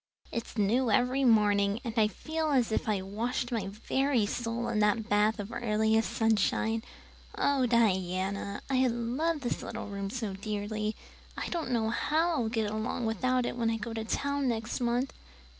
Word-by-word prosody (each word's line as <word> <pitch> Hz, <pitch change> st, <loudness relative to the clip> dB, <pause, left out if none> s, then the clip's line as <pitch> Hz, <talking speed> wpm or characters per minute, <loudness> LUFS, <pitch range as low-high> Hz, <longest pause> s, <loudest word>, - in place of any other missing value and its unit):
It's 230 Hz, 0 st, -5 dB
new 230 Hz, +5 st, +2 dB
every 250 Hz, +5 st, +2 dB
morning, 205 Hz, -3 st, +4 dB
and 230 Hz, -3 st, -4 dB
I 220 Hz, -2 st, +4 dB
feel 315 Hz, +8 st, -3 dB
as 255 Hz, -6 st, +2 dB
if 220 Hz, -, 0 dB
I 200 Hz, -3 st, 0 dB
washed 235 Hz, +5 st, -2 dB
my 220 Hz, -5 st, -1 dB
very 245 Hz, +4 st, +1 dB
soul 235 Hz, +2 st, -2 dB
in 220 Hz, -2 st, 0 dB
that 215 Hz, +1 st, +2 dB
bath 210 Hz, +2 st, +3 dB
of 205 Hz, +2 st, -5 dB
earliest 220 Hz, -1 st, +1 dB
sunshine. 225 Hz, 0 st, +1 dB, 0.6 s
Oh, 275 Hz, -3 st, +2 dB
Diana, 200 Hz, -3 st, +1 dB
I 260 Hz, -1 st, +3 dB
love 255 Hz, +7 st, -1 dB
this 245 Hz, -, -2 dB
little -, -, -5 dB
room 200 Hz, -1 st, -4 dB
so 220 Hz, -3 st, -3 dB
dearly. 210 Hz, +1 st, -3 dB, 0.4 s
I -, -, -3 dB
don't 335 Hz, -6 st, -2 dB
know 225 Hz, -3 st, +1 dB
how 320 Hz, +7 st, +1 dB
I'll 250 Hz, -9 st, 0 dB
get 220 Hz, -2 st, -1 dB
along 220 Hz, +2 st, -2 dB
without 250 Hz, +3 st, +1 dB
it -, -, -2 dB
when 230 Hz, -2 st, +1 dB
I 225 Hz, -, 0 dB
go 225 Hz, +1 st, -5 dB
to 225 Hz, -1 st, -3 dB
town 280 Hz, +4 st, -1 dB
next 225 Hz, -1 st, -2 dB
month." 245 Hz, +2 st, 0 dB
225 Hz, 175 wpm, -30 LUFS, 210-250 Hz, 0.6 s, morning